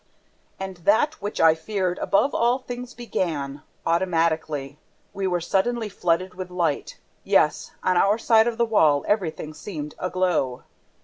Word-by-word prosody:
And 190 Hz, -1 st, -5 dB
that 220 Hz, -, +2 dB
which 205 Hz, +1 st, -4 dB
I 160 Hz, -1 st, +6 dB
feared 180 Hz, +2 st, -2 dB
above 270 Hz, +8 st, +2 dB
all 240 Hz, +2 st, +2 dB
things 250 Hz, -1 st, -8 dB
began, 150 Hz, -, -3 dB, 0.2 s
AUTOMATICALLY. 160 Hz, -5 st, 0 dB, 0.3 s
We 195 Hz, -1 st, -2 dB
were 180 Hz, -1 st, 0 dB
suddenly 215 Hz, +6 st, 0 dB
flooded 180 Hz, 0 st, 0 dB
with 185 Hz, 0 st, -6 dB
light! 170 Hz, -5 st, -2 dB, 0.3 s
Yes, -, -, +2 dB
on 185 Hz, -1 st, +2 dB
our 200 Hz, +4 st, +4 dB
side 225 Hz, 0 st, +4 dB
of 235 Hz, -1 st, -2 dB
the 235 Hz, -, +3 dB
wall, 155 Hz, -10 st, +3 dB
everything 165 Hz, -6 st, -1 dB
seemed 150 Hz, -2 st, -7 dB
aglow. 180 Hz, -9 st, 0 dB
185 Hz, 140 wpm, -24 LUFS, 160-215 Hz, 0.3 s, I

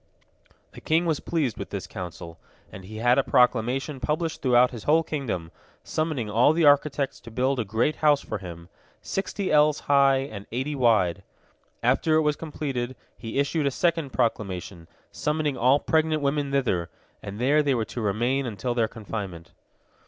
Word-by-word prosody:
'" -, -, -35 dB
The -, -, -11 dB
king 165 Hz, +2 st, +1 dB
was 160 Hz, -4 st, 0 dB
pleased 150 Hz, -9 st, -1 dB
with -, -, -6 dB
this -, -, -5 dB
counsel, 85 Hz, -2 st, -8 dB, 0.3 s
and 95 Hz, -, -10 dB
he 110 Hz, +3 st, -9 dB
had 120 Hz, +3 st, +3 dB
a -, -, +3 dB
proclamation 125 Hz, +4 st, +1 dB
published 155 Hz, +6 st, -2 dB
throughout 125 Hz, -1 st, +4 dB
his 120 Hz, -4 st, -9 dB
whole 160 Hz, +2 st, +4 dB
kingdom, 115 Hz, -, -4 dB, 0.3 s
summoning 155 Hz, -8 st, -2 dB
all 115 Hz, +8 st, +4 dB
the 165 Hz, 0 st, +2 dB
architects 145 Hz, -1 st, +3 dB
to -, -, -12 dB
build 130 Hz, +3 st, 0 dB
a -, -, +1 dB
great 110 Hz, +9 st, 0 dB
house 150 Hz, -2 st, +3 dB
for -, -, -5 dB
him, 85 Hz, -2 st, -9 dB, 0.4 s
sixty 195 Hz, 0 st, -3 dB
ells 150 Hz, 0 st, +4 dB
high 140 Hz, -1 st, +4 dB
and 105 Hz, -8 st, -8 dB
eighty 130 Hz, +5 st, -2 dB
wide. 110 Hz, -9 st, +2 dB, 0.6 s
After 160 Hz, -1 st, +2 dB
it 160 Hz, -, +4 dB
was 150 Hz, -1 st, +1 dB
completed, 135 Hz, -6 st, -4 dB, 0.2 s
he 115 Hz, +2 st, -6 dB
issued 145 Hz, +1 st, +1 dB
a -, -, +4 dB
second 165 Hz, 0 st, 0 dB
proclamation, 95 Hz, -8 st, -2 dB, 0.2 s
summoning 150 Hz, -2 st, -1 dB
all 130 Hz, +4 st, +4 dB
pregnant 155 Hz, -1 st, +1 dB
women 140 Hz, 0 st, 0 dB
thither, 110 Hz, -12 st, 0 dB, 0.3 s
and 100 Hz, 0 st, -7 dB
there 140 Hz, +6 st, +3 dB
they 140 Hz, -3 st, +1 dB
were 115 Hz, -2 st, -1 dB
to 120 Hz, -, -6 dB
remain 120 Hz, +6 st, 0 dB
until 115 Hz, +2 st, -3 dB
their 115 Hz, -2 st, +1 dB
confinement. 100 Hz, -6 st, -7 dB
130 Hz, 175 wpm, -25 LUFS, 110-150 Hz, 0.6 s, throughout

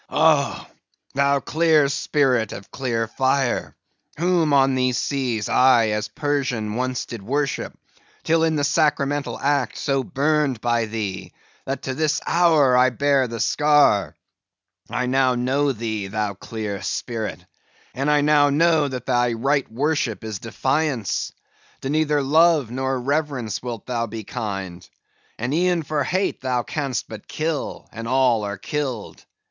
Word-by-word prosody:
"Oh! 150 Hz, -2 st, +2 dB, 0.5 s
thou 140 Hz, +1 st, +2 dB
clear 155 Hz, -2 st, +3 dB
spirit 130 Hz, -5 st, +1 dB
of 100 Hz, -, -10 dB
clear 115 Hz, -4 st, -2 dB
fire, 130 Hz, +2 st, 0 dB, 0.4 s
whom 170 Hz, -2 st, +2 dB
on 135 Hz, -1 st, +4 dB
these 130 Hz, -1 st, +1 dB
seas 125 Hz, -7 st, -1 dB
I 120 Hz, -4 st, +4 dB
as 105 Hz, 0 st, -1 dB
Persian 130 Hz, -6 st, -2 dB
once 125 Hz, +2 st, -2 dB
did 115 Hz, -3 st, -8 dB
worship, 140 Hz, +7 st, -2 dB, 0.5 s
till 165 Hz, 0 st, +2 dB
in 160 Hz, -1 st, +2 dB
the 145 Hz, -, 0 dB
sacramental 145 Hz, -1 st, +1 dB
act 145 Hz, 0 st, 0 dB
so 135 Hz, -2 st, 0 dB
burned 145 Hz, -2 st, 0 dB
by 120 Hz, 0 st, +1 dB
thee, 105 Hz, -4 st, -5 dB, 0.3 s
that 135 Hz, +1 st, -3 dB
to 130 Hz, -, -3 dB
this 150 Hz, +2 st, 0 dB
hour 160 Hz, -7 st, +4 dB
I 125 Hz, +1 st, +5 dB
bear 140 Hz, +1 st, +2 dB
the 115 Hz, 0 st, -6 dB
scar; 145 Hz, -6 st, +3 dB, 0.7 s
I 125 Hz, -, -1 dB
now 130 Hz, 0 st, +2 dB
know 135 Hz, +4 st, +1 dB
thee, 110 Hz, -4 st, -4 dB
thou 105 Hz, 0 st, -2 dB
clear 105 Hz, 0 st, -5 dB
spirit, 105 Hz, -8 st, -4 dB, 0.5 s
and 135 Hz, +3 st, -1 dB
I 150 Hz, 0 st, +4 dB
now 145 Hz, -1 st, +4 dB
know 155 Hz, 0 st, +3 dB
that 125 Hz, -3 st, -6 dB
thy 120 Hz, -2 st, +1 dB
right 135 Hz, +3 st, 0 dB
worship 135 Hz, -3 st, -1 dB
is 110 Hz, -3 st, -5 dB
defiance. 130 Hz, -, -1 dB, 0.5 s
To 135 Hz, -, -3 dB
neither 150 Hz, -2 st, +1 dB
love 155 Hz, -3 st, +3 dB
nor 130 Hz, +1 st, -1 dB
reverence 135 Hz, -5 st, -2 dB
wilt 120 Hz, -3 st, -6 dB
thou 115 Hz, -2 st, -2 dB
be 110 Hz, 0 st, -7 dB
kind; 95 Hz, -6 st, -6 dB, 0.5 s
and 120 Hz, +4 st, -2 dB
e'en 175 Hz, 0 st, +1 dB
for 150 Hz, 0 st, -1 dB
hate 185 Hz, +8 st, -1 dB
thou 125 Hz, -2 st, 0 dB
canst 135 Hz, -4 st, -3 dB
but 110 Hz, -2 st, -10 dB
kill; 155 Hz, -2 st, -3 dB
and 115 Hz, 0 st, -7 dB
all 125 Hz, -3 st, +2 dB
are 100 Hz, -1 st, -4 dB
killed. 130 Hz, -1 st, -4 dB
130 Hz, 145 wpm, -22 LUFS, 115-145 Hz, 0.7 s, I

